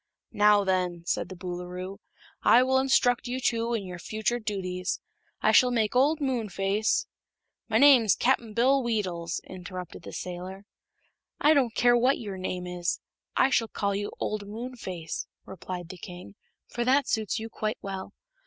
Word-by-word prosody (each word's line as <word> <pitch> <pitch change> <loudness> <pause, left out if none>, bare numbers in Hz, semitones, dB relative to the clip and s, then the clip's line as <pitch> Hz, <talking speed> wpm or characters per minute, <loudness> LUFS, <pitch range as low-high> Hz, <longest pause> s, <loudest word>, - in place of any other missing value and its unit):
"Now, 210 -1 +5
then," 180 -3 0
said 175 - -1
the 185 - -7
Boolooroo, 180 +1 -6 0.4
"I 250 - +6
will 265 +1 +3
instruct 250 -2 +3
you 250 +1 -2
two 235 -1 0
in 205 -4 -3
your 180 -1 -7
future 220 +5 -1
duties. 185 -4 -3 0.4
I - - +5
shall 250 - +6
make 225 -2 0
old 290 +5 +4
Moonface 220 - 0 0.3
" - - -54
"My - - +3
name's 255 -8 +7
Cap'n 240 -3 +1
Bill 265 +5 +3
Weedles," 190 -8 -2
interrupted 180 -1 -8
the - - -9
sailor. 185 +2 -6 0.7
"I 300 - +5
don't 255 -6 +2
care 240 0 +5
what 250 +3 +3
your 200 -4 -6
name 185 -1 -3
is; 180 -1 -2 0.4
I 265 - +4
shall 230 -3 +2
call 200 -2 -1
you 205 +1 -3
old 210 -1 -3
Moonface," 210 -7 -6 0.2
replied 180 -2 -7
the 185 -1 -9
king, 180 +3 -9 0.3
"for 240 - -2
that 265 +2 +3
suits 220 -3 0
you 220 0 -4
quite 215 -1 -3
well. 195 -1 -5
210 Hz, 160 wpm, -27 LUFS, 185-245 Hz, 0.7 s, name's